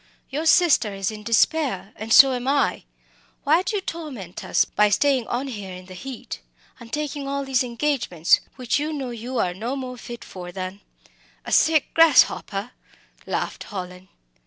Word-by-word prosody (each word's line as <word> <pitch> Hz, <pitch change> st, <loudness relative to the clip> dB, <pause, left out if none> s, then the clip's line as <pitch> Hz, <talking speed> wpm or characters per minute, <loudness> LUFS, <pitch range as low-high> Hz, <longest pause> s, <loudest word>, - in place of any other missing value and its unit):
Your 305 Hz, +4 st, -2 dB
sister 315 Hz, -, +4 dB
is 195 Hz, +1 st, -2 dB
in 215 Hz, -1 st, -8 dB
despair, 230 Hz, 0 st, +1 dB
and 220 Hz, +1 st, -7 dB
so 265 Hz, +2 st, +8 dB
am 250 Hz, 0 st, -4 dB
I. 280 Hz, +1 st, +1 dB, 0.6 s
Why 310 Hz, +4 st, +4 dB
do 400 Hz, +3 st, -3 dB
you 400 Hz, -, 0 dB
torment 265 Hz, -, -7 dB
us -, -, +2 dB
by 210 Hz, 0 st, +2 dB
staying 260 Hz, +2 st, +2 dB
on 255 Hz, +3 st, -2 dB
here 205 Hz, -7 st, -7 dB
in 185 Hz, 0 st, -11 dB
the 185 Hz, -, -11 dB
heat, 225 Hz, -, -8 dB, 0.4 s
and 230 Hz, -1 st, -12 dB
taking 295 Hz, -2 st, -3 dB
all 280 Hz, 0 st, -2 dB
these 265 Hz, -1 st, +1 dB
engagements, 235 Hz, -, +1 dB, 0.2 s
which 255 Hz, +2 st, -1 dB
you 305 Hz, +2 st, -2 dB
know 270 Hz, -4 st, -4 dB
you 240 Hz, +2 st, -5 dB
are 180 Hz, -5 st, +1 dB
no 230 Hz, +8 st, -4 dB
more 255 Hz, -2 st, -6 dB
fit 240 Hz, 0 st, -9 dB
for 180 Hz, -1 st, -9 dB
than 185 Hz, +2 st, -6 dB, 0.3 s
" -, -, -33 dB
"A -, -, -6 dB
sick 315 Hz, -2 st, +3 dB
grasshopper," 250 Hz, -8 st, +4 dB, 0.6 s
laughed -, -, -3 dB
Hallin. 180 Hz, -2 st, -7 dB
245 Hz, 175 wpm, -23 LUFS, 200-285 Hz, 0.6 s, so